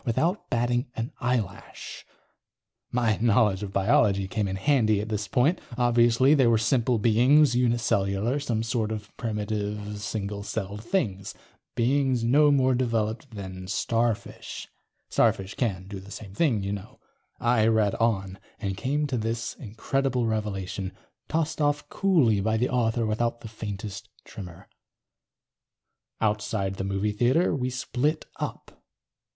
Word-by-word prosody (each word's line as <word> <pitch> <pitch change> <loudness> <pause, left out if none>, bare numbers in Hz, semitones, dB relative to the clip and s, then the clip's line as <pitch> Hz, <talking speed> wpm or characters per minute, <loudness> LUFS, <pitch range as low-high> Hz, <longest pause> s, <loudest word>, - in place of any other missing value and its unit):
Without 165 - 0
batting 120 +2 +1
an 115 +2 -3
eyelash. 120 -6 -3 0.8
My 115 -3 +1
knowledge 110 -4 +3
of 100 -2 -5
biology 100 -1 +3
came 105 0 -1
in 95 - -3
handy, 110 -2 +2
at 105 +2 -4
this 105 -2 -2
point. 135 - +2 0.2
Obviously 120 +2 +4
they 135 -5 +4
were 115 -1 +4
simple 120 +1 +2
beings, 120 +5 +4
uni 120 -1 +3
cellular, 105 +3 0
some 115 -6 -1
sort 115 -2 -1
of 105 -1 -6
primitive 105 -1 -3
single 100 -1 -3
celled 100 0 -4
things. 105 - -2 0.4
Beings 130 0 +2
no 145 +6 +5
more 130 -2 +4
developed 115 -3 -1
than 95 -2 -7
starfish. 115 +2 -2 0.4
Starfish 95 0 +1
can 95 -7 -2
do 100 -1 -6
the 95 +2 -13
same 100 -2 -9
thing, 115 -6 +1
you 100 - -2
know. 100 +1 -8 0.4
I 120 -2 +3
read 110 -3 +3
on. 100 -4 0 0.2
And 100 -3 -2
came 145 +8 -1
to 130 -4 -1
this 115 +1 -2
incredible 125 +2 -1
revelation, 95 -4 -3 0.4
tossed 160 0 -1
off 145 0 +1
coolly 155 - +3
by 110 +2 +1
the 125 +3 +1
author 115 -2 +1
without 115 +2 -1
the - - -8
faintest 105 -2 -6 0.2
tremor: 90 -4 -10
_... - - -37 1.5
outside 105 -2 -1
the - - -2
movie 100 +2 -1
theater 125 - +2
we 130 -2 -1
split 130 +4 -1
up. - - -6
115 Hz, 140 wpm, -26 LUFS, 100-125 Hz, 1.5 s, no